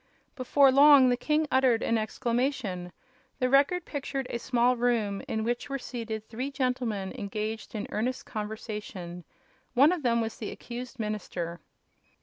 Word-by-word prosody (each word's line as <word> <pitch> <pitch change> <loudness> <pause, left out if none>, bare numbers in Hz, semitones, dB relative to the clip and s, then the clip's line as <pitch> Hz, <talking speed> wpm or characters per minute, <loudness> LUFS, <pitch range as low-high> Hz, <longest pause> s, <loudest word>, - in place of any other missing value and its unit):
Before 270 +1 +4
long 280 -1 +8
the 245 - +3
king 305 +5 +1
uttered 260 -3 +3
an 230 - +1
exclamation. 230 -5 -1 0.5
The 255 0 0
Record 290 +6 +4
pictured 275 -2 -4
a 235 - -2
small 245 0 +2
room 230 -5 0
in 220 0 -1
which 240 +4 -2
were 275 - -1
seated 230 -4 -6
three 250 +5 -4
gentlemen 250 -7 -2
engaged 215 +3 -4
in 210 - -3
earnest 250 +4 -2
conversation. 210 -5 -6 0.5
One 280 +6 +6
of 360 -3 -1
them 235 -3 +2
was 225 -1 -3
the 215 - -4
accused 250 +2 -8
minister. 180 -5 -4
240 Hz, 145 wpm, -28 LUFS, 215-260 Hz, 0.5 s, long